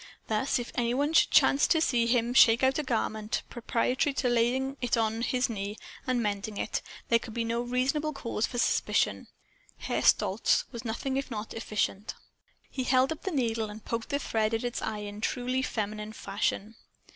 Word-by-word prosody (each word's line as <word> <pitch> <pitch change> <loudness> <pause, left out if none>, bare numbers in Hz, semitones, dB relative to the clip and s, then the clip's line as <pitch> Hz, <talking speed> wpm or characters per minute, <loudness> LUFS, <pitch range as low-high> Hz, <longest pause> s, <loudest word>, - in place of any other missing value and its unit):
Thus, 220 +6 +1
if 245 -1 -5
any 240 0 0
one 290 +4 0
should - - +5
chance 275 - +5
to 325 - +3
see 240 -7 +2
him 240 0 +2
shake 235 -1 +6
out 265 +3 +3
a - - -1
garment, 220 -4 -2
preparatory 250 +4 0
to 250 - +1
laying 250 +3 +1
it 245 -1 +1
on 225 0 0
his 250 +1 +1
knee 205 -1 -4 0.3
and 250 -2 +1
mending 205 0 -3
it, - - -2 0.3
there 230 - +5
could 225 -1 -9
be 235 - 0
no 230 +1 -1
reasonable 260 +5 0
cause 230 -6 -2
for 245 - -6
suspicion. 235 - +1 0.5
Herr - - -2
Stolz - - +3
was 235 -3 -7
nothing 260 +4 -2
if 275 - -3
not 215 -2 -5
efficient. 210 -2 -2 0.6
He 260 -2 -3
held 255 +2 +3
up 320 - -5
the 385 - -3
needle 230 -6 0
and 210 +1 -10
poked 230 0 -3
the 285 - +1
thread 220 -5 0
at 225 - -3
its 245 -1 -3
eye 210 -1 -3
in 205 +1 -7
truly 250 +3 -1
feminine 215 -3 -3
fashion. 205 +2 -2
235 Hz, 190 wpm, -29 LUFS, 220-260 Hz, 0.6 s, shake